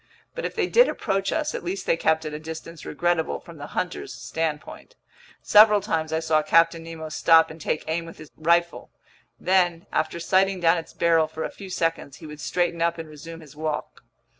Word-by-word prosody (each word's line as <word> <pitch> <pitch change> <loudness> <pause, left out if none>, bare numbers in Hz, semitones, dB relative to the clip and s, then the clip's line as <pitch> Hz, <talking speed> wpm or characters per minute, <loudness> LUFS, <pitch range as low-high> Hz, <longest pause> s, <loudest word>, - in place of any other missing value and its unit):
But - - -5
if - - -4
they - - +1
did - - +5
approach 195 0 -1
us, 310 -1 -1
at - - -5
least 185 +3 -4
they - - +2
kept 160 -1 +1
at 155 - -5
a 150 - -5
distance 160 +1 -9
regrettable 175 -2 0
from 170 -3 -13
the 145 - -8
hunter's 180 -2 -3
standpoint. 160 - -5 0.5
Several 210 0 +7
times 165 -6 -2
I 160 - +1
saw 160 -1 +2
Captain 165 +2 +3
Nemo 165 -1 -8
stop 160 +1 +4
and 160 0 -12
take 155 - -2
aim 165 +1 -2
with 165 - -11
his 155 - -13
rifle; 170 +2 +1 0.5
then, 175 -2 +1
after 155 +2 -1
sighting 190 +2 +2
down 165 0 +3
its 165 - -11
barrel 165 -2 +3
for 160 - -6
a - - -4
few 195 -2 -10
seconds, 165 -5 -2
he 165 - -12
would 150 -1 -9
straighten 175 -2 -1
up 170 0 +1
and 165 -1 -7
resume 165 +2 -10
his 150 -2 -15
walk. 155 0 -4
165 Hz, 205 wpm, -24 LUFS, 160-175 Hz, 0.5 s, Several